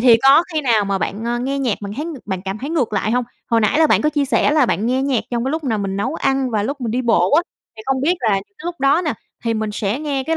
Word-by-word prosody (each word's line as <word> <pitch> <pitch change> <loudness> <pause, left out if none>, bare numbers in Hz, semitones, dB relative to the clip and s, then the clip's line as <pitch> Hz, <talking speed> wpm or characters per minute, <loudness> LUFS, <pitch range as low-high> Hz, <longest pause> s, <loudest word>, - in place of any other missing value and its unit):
thì 240 -1 +7
có 275 +5 +7
khi 310 - 0
nào 230 -7 +2
mà, 200 - -1
ơ, 195 - 0
bạn 235 +6 -2
nghe 275 +1 -1
nhạc 250 -6 0
mà 200 - -5
bạn 200 - -6
thấy 300 - -3
ng 335 -2 -5
bạn 190 -2 -3
cảm 195 +2 -4
thấy 280 +6 -5
ngược 260 -10 0
lại 205 +2 0
hông? 250 +1 +1 0.2
Hồi 230 -1 +2
nãy 215 +8 +2
là 320 - +6
bạn - - +3
có 300 - +3
chia 290 -2 0
sẻ 275 - +2
là 300 -3 +3
bạn 220 0 0
nghe 260 +2 +1
nhạc 270 -4 0
trong 235 -1 -1
cái 265 - -1
lúc 315 0 -3
là 225 -4 0
mình 195 -1 -3
nấu 255 +10 -2
ăn 270 -3 0
và 215 -3 0
lúc 275 +4 -3
mình 230 -3 -2
đi 250 +2 -1
bộ 190 -7 +3
á, 330 +4 +5 0.3
thì 220 - -9
không 270 -1 0
biết 330 +7 +2
là 225 - +1
cái 195 - -2
lúc 345 -4 -5
đó 280 +6 +3
nè 305 - 0 0.3
thì 230 -1 0
mình 215 -1 -2
sẽ 210 +4 -2
nghe 280 -3 -2
cái 325 0 0
250 Hz, 325 wpm, -19 LUFS, 215-285 Hz, 0.3 s, thì